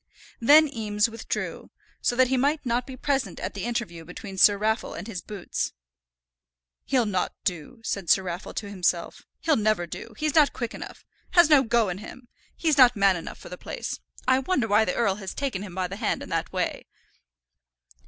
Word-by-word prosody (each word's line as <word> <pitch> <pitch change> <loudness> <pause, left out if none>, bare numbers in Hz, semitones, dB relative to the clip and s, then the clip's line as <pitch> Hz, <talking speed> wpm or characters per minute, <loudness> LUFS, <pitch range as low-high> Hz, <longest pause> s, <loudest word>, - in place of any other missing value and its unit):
Then 300 +6 +7
Eames 215 -4 0
withdrew, 230 - -4 0.3
so 245 - +1
that 255 0 +4
he 265 - +2
might 285 +3 +1
not 240 0 0
be 260 -1 -8
present 275 0 -1
at - - -4
the 200 -1 -5
interview 230 -9 -3
between 195 +4 -9
Sir 200 +2 +6
Raffle 220 +2 -1
and - - -6
his 200 -5 -5
boots. 205 -4 -4 1.1
"He'll 255 -4 +2
not 190 -4 -1
do," 180 - -4
said 200 -6 -3
Sir 190 - +5
Raffle 180 +1 -6
to 205 - -3
himself. 180 -3 -2
"He'll 315 - +3
never 215 -4 +1
do. 220 +6 -9
He's 305 -1 0
not 300 -3 +5
quick 235 -2 -4
enough, - - -9 0.3
has 345 -3 +6
no 290 -3 +8
go 235 -3 +2
in 180 +1 -4
him. 240 +3 -11 0.3
He's 310 -4 +1
not 245 -1 +8
man 195 -2 +4
enough 170 - -7
for - - -12
the 180 - -8
place. - - -5 0.3
I 260 0 +5
wonder 265 -4 0
why 215 +1 +4
the 180 - -1
earl 200 -5 +1
has 195 -3 -7
taken 270 -9 -2
him 195 -4 -8
by 185 -1 -1
the 195 +2 -7
hand 220 -1 -1
in - - -10
that - - -2
way." - - -2
220 Hz, 200 wpm, -26 LUFS, 195-260 Hz, 1.1 s, no